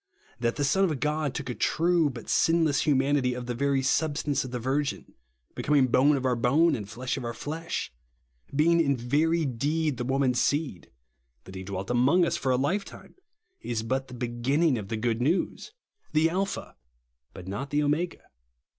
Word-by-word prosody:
That 120 -1 0
the 145 - -1
Son 190 +8 +2
of 155 -8 0
God 150 0 -1
took - - -4
a 125 - -2
true 165 +3 +2
but 120 -4 -9
sin 165 0 +3
less 145 -1 +1
humanity 135 -2 +2
of 125 0 -5
the 120 - -3
very 135 +2 0
substance 145 0 0
of 130 - -7
the 125 - -4
virgin; 135 +4 -2 0.4
becoming 145 -2 +2
bone 140 +4 +4
of 130 - -4
our 125 -1 +2
bone, 145 +8 +3
and 105 -5 -6
flesh 125 +5 -3
of 135 - -5
our 120 -1 -4
flesh; 160 - -4 0.6
being 165 +3 +4
in 140 -4 +1
very 155 +7 +1
deed 145 +3 -1
the 125 - -2
woman's 130 -1 +1
seed; 145 - -1 0.5
that 95 - -12
he 95 - -6
dwelt 95 +2 -5
among 140 +9 +4
us - - -1
for 130 - -1
a 125 - +3
lifetime, 180 +10 -3 0.5
is 115 -2 -3
but 130 +3 -2
the 125 - -10
beginning 125 +6 +1
of 100 - -7
the 110 - -3
good 115 +1 -1
news; 165 - -1 0.4
the 160 +1 +3
Alpha, 195 +2 -3 0.6
but 90 - -11
not 125 +9 -4
the 150 +1 +1
Omega. 160 +4 -1
135 Hz, 185 wpm, -27 LUFS, 125-155 Hz, 0.6 s, bone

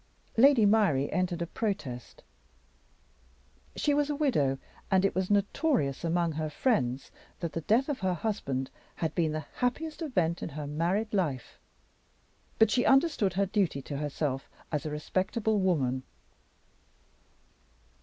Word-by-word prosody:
Lady 250 -2 +6
Myrie 200 -10 +3
entered 180 -2 0
a - - -2
protest. 155 - -4 1.5
She 290 - +1
was 290 0 +1
a 295 - 0
widow; 155 - +1 0.3
and 190 -1 +3
it 195 - +1
was 185 0 -1
notorious 205 - +1
among 170 0 +1
her 155 0 -3
friends 135 - 0 0.3
that 170 -3 -4
the 165 - -2
death 225 - +2
of 290 -3 -2
her 185 -2 0
husband 140 -10 -2 0.2
had 160 - -2
been 165 -3 +1
the 155 -1 -4
happiest 300 +7 -2
event 180 - 0
in - - -4
her 150 0 -6
married 175 +9 -1
life. 150 - -2 1.0
But 220 -1 +5
she 245 - +3
understood 270 - +3
her 200 +2 +2
duty 185 -8 0
to 140 - -5
herself 145 -2 -2 0.2
as 150 -1 -2
a - - -2
respectable 190 +8 0
woman. 140 -9 +1
180 Hz, 140 wpm, -29 LUFS, 150-220 Hz, 1.5 s, Lady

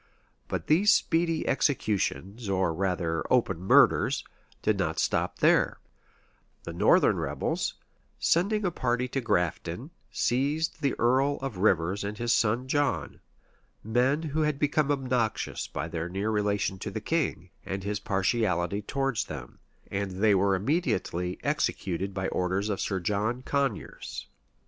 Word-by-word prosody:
But - - -3
these 190 +7 +5
speedy 165 -3 +1
executions, 105 - 0
or 95 -3 +1
rather 90 -3 -1
open - - +2
murders, 95 - +4 0.4
did - - +1
not - - -1
stop - - 0
there: - - +3 0.9
the - - -6
northern - - +4
rebels, - - -2 0.4
sending 200 +5 +2
a 180 - +1
party 125 -4 0
to 135 - -2
Grafton, 90 - -1 0.2
seized 145 +7 0
the 140 -3 +1
earl 130 +4 +2
of 130 -8 -4
Rivers 95 -1 +2
and 105 +1 -4
his 120 +1 +1
son 115 +3 +1
John; 145 +1 0 0.6
men 125 +8 +1
who 155 0 -1
had 150 -2 +1
become 145 0 +1
obnoxious 125 -5 -1
by 70 +3 -4
their 85 +1 -4
near 100 +4 -1
relation 100 -2 0
to 105 - -4
the 100 - -4
king, 105 - -2
and 95 0 -4
his 105 0 -2
partiality 95 -2 0
towards 135 +2 -1
them: 65 -5 -9 0.3
and 100 0 -1
they 105 +3 +3
were 100 0 +3
immediately 95 - -1
executed 95 +1 -1
by 95 -1 -2
orders 95 +3 -1
from 100 - -2
Sir 95 - -1
John 105 +7 -1
Coniers. 140 -6 -3
105 Hz, 140 wpm, -28 LUFS, 95-135 Hz, 0.9 s, these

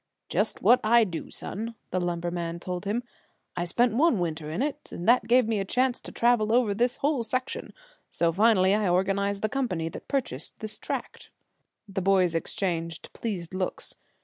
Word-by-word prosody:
"Just - - -1
what 250 - +6
I 230 +2 +6
do, 175 -6 -5
son," 225 +4 -5 0.2
the 185 - 0
lumberman 170 -1 -2
told 180 +2 -5
him. 220 +5 -1 0.5
"I 175 -1 -1
spent 235 +6 +3
one 290 +1 +4
winter 160 -3 -2
in 165 +11 -1
it, 295 0 -4
and 175 - -6
that 235 -1 +5
gave 245 0 +4
me 225 -2 0
a - - 0
chance 250 +5 0
to - - -9
travel 235 -2 +2
over 235 -3 +3
this 245 +5 +1
whole 285 -3 0
section, 255 +3 -3 0.4
so 170 -1 +1
finally 195 0 +4
I 210 -2 +2
organized 200 +2 +1
the - - +3
company 210 -10 -1
that - - -10
purchased 200 - -2
this 215 -1 -6
tract." - - -5 0.6
The 195 -1 -3
boys 185 -2 +3
exchanged 165 -1 -2
pleased 190 -7 -4
looks. 185 -1 -3
200 Hz, 175 wpm, -27 LUFS, 175-235 Hz, 0.6 s, what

